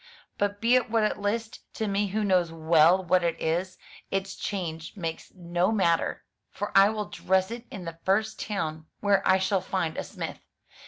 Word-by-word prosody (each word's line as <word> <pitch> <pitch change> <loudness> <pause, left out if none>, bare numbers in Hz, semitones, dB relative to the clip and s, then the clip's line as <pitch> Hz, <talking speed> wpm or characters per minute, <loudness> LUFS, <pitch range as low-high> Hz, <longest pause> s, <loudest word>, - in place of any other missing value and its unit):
But 205 0 0
be 230 +3 +3
it 255 -1 +3
what 225 -1 +2
it 215 - 0
list, 220 +3 -3
to 220 - -2
me 200 +1 +1
who 215 +3 -1
knows 180 -4 +2
well 165 +3 +4
what 180 +1 +3
it 165 -1 0
is, 180 +3 -1 0.3
its 195 0 -2
change 165 -4 -5
makes 165 -3 -5
no 175 +2 0
matter, 170 -6 +1 0.2
for 205 +1 -5
I 195 +1 +8
will 215 -1 -2
dress 190 +1 0
it 235 +1 -7
in 185 -3 -8
the 165 0 -7
first 215 +3 +1
town 160 -6 -3
where 200 -1 +3
I 190 - +6
shall 190 0 +1
find 170 -5 -2
a - - -2
smith. - - -6
190 Hz, 190 wpm, -27 LUFS, 170-205 Hz, 0.3 s, I